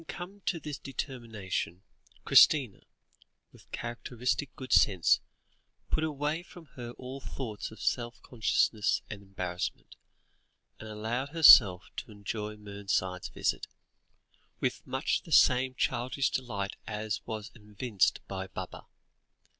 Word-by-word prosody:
Having 165 Hz, -, -19 dB
come 190 Hz, +3 st, -8 dB
to 170 Hz, -, 0 dB
this 150 Hz, -3 st, -6 dB
determination, 110 Hz, -, -4 dB, 0.4 s
Christina, 130 Hz, -10 st, +6 dB, 0.7 s
with -, -, -19 dB
characteristic 125 Hz, +3 st, -2 dB
good 130 Hz, -1 st, -4 dB
sense, 95 Hz, -5 st, +5 dB, 0.7 s
put 155 Hz, -, +1 dB
away 150 Hz, +1 st, -1 dB
from 175 Hz, -1 st, -14 dB
her 120 Hz, -1 st, -7 dB
all 130 Hz, +2 st, -8 dB
thoughts 110 Hz, -6 st, -5 dB
of 110 Hz, -, -13 dB
self 120 Hz, -1 st, -1 dB
consciousness 110 Hz, -2 st, +1 dB
and 105 Hz, -2 st, -7 dB
embarrassment, 90 Hz, -2 st, -5 dB, 0.8 s
and 110 Hz, -, -8 dB
allowed 115 Hz, +6 st, -3 dB
herself 115 Hz, -, +8 dB
to 120 Hz, -, -6 dB
enjoy 105 Hz, +1 st, -5 dB
Mernside's 100 Hz, -3 st, -3 dB
visit, -, -, -1 dB, 0.9 s
with -, -, -1 dB
much -, -, 0 dB
the -, -, -14 dB
same 130 Hz, +1 st, +5 dB
childish 125 Hz, +2 st, 0 dB
delight 105 Hz, -6 st, -3 dB
as 105 Hz, -1 st, -3 dB
was 110 Hz, -1 st, -5 dB
evinced 105 Hz, -1 st, 0 dB
by 95 Hz, -1 st, -5 dB
Baba. 95 Hz, -1 st, -8 dB
115 Hz, 120 wpm, -30 LUFS, 100-130 Hz, 0.9 s, herself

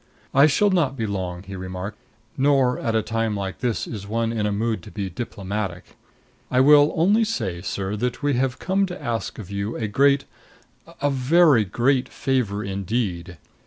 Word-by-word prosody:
"I 140 Hz, +3 st, +7 dB
shall 205 Hz, +7 st, +3 dB
not 150 Hz, -8 st, +1 dB
be 115 Hz, -, -1 dB
long," 90 Hz, -3 st, -4 dB
he 100 Hz, 0 st, -8 dB
remarked. 95 Hz, +2 st, -6 dB, 0.4 s
"Nor 135 Hz, -2 st, +3 dB
at 115 Hz, -1 st, -1 dB
a 110 Hz, -, +2 dB
time 115 Hz, -2 st, -1 dB
like 95 Hz, -1 st, -4 dB
this 120 Hz, -4 st, -1 dB
is 100 Hz, -3 st, -7 dB
one 115 Hz, +2 st, -1 dB
in 110 Hz, -2 st, -1 dB
the 105 Hz, -, 0 dB
mood 110 Hz, +2 st, -1 dB
to 105 Hz, -, -11 dB
be 100 Hz, -2 st, -5 dB
diplomatic. 100 Hz, -2 st, -5 dB, 0.5 s
I 125 Hz, -, +2 dB
will 145 Hz, +2 st, +6 dB
only 200 Hz, +8 st, +4 dB
say, 110 Hz, -, -2 dB
sir, 95 Hz, +1 st, -3 dB
that 125 Hz, +5 st, -3 dB
we 145 Hz, 0 st, +2 dB
have 125 Hz, 0 st, 0 dB
come 195 Hz, +1 st, 0 dB
to 180 Hz, 0 st, -7 dB
ask 115 Hz, -7 st, -3 dB
of 100 Hz, -3 st, -9 dB
you 100 Hz, +3 st, -3 dB
a 110 Hz, -, -2 dB
great 140 Hz, +6 st, +3 dB, 0.8 s
a 145 Hz, -, +3 dB
very 135 Hz, -2 st, +4 dB
great 125 Hz, +6 st, +1 dB
favor 115 Hz, -6 st, -1 dB
indeed. 95 Hz, -3 st, -3 dB
115 Hz, 180 wpm, -23 LUFS, 100-135 Hz, 0.8 s, I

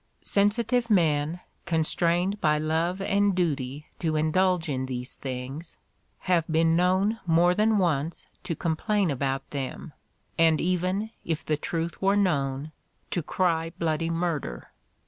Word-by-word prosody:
Sensitive 230 Hz, +4 st, +2 dB
men, 160 Hz, -3 st, +2 dB, 0.3 s
constrained 175 Hz, +4 st, +1 dB
by 150 Hz, -1 st, +3 dB
love 165 Hz, +5 st, 0 dB
and 200 Hz, 0 st, +2 dB
duty 145 Hz, -5 st, -1 dB
to 160 Hz, -2 st, 0 dB
indulge 170 Hz, +3 st, +2 dB
in 130 Hz, -3 st, -2 dB
these 125 Hz, 0 st, -5 dB
things, 135 Hz, +5 st, -6 dB, 0.4 s
have 180 Hz, -3 st, +2 dB
been 165 Hz, 0 st, +3 dB
known 190 Hz, +5 st, +2 dB
more 170 Hz, +2 st, +4 dB
than 215 Hz, +3 st, +3 dB
once 165 Hz, -4 st, 0 dB, 0.2 s
to 165 Hz, -, -3 dB
complain 170 Hz, +4 st, 0 dB
about 135 Hz, 0 st, -2 dB
them 140 Hz, +2 st, -5 dB, 0.5 s
and 160 Hz, -2 st, +5 dB
even, 185 Hz, +4 st, 0 dB
if 160 Hz, -2 st, -3 dB
the 155 Hz, -, +1 dB
truth 165 Hz, +2 st, -4 dB
were 195 Hz, +1 st, +3 dB
known, 145 Hz, -6 st, 0 dB, 0.4 s
to 175 Hz, -, 0 dB
cry 165 Hz, 0 st, 0 dB
bloody 165 Hz, 0 st, 0 dB
murder. 165 Hz, -, -3 dB
165 Hz, 130 wpm, -27 LUFS, 150-185 Hz, 0.5 s, and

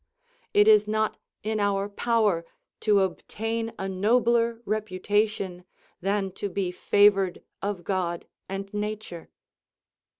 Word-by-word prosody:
It 205 Hz, +1 st, +5 dB
is 210 Hz, -1 st, +6 dB
not 215 Hz, 0 st, 0 dB, 0.2 s
in 215 Hz, +1 st, -1 dB
our 200 Hz, -1 st, +1 dB
power 210 Hz, -4 st, +1 dB, 0.4 s
to 205 Hz, -2 st, +3 dB
obtain 225 Hz, +4 st, -2 dB
a 190 Hz, -, -3 dB
nobler 230 Hz, +4 st, +2 dB
reputation 205 Hz, -2 st, -1 dB, 0.4 s
than 195 Hz, 0 st, 0 dB
to 205 Hz, -, -1 dB
be 185 Hz, -1 st, -2 dB
favoured 195 Hz, 0 st, +3 dB, 0.2 s
of 200 Hz, -3 st, -3 dB
God 175 Hz, -2 st, -2 dB, 0.2 s
and 195 Hz, +1 st, -5 dB
nature. 210 Hz, -4 st, -5 dB
205 Hz, 110 wpm, -26 LUFS, 190-215 Hz, 0.4 s, is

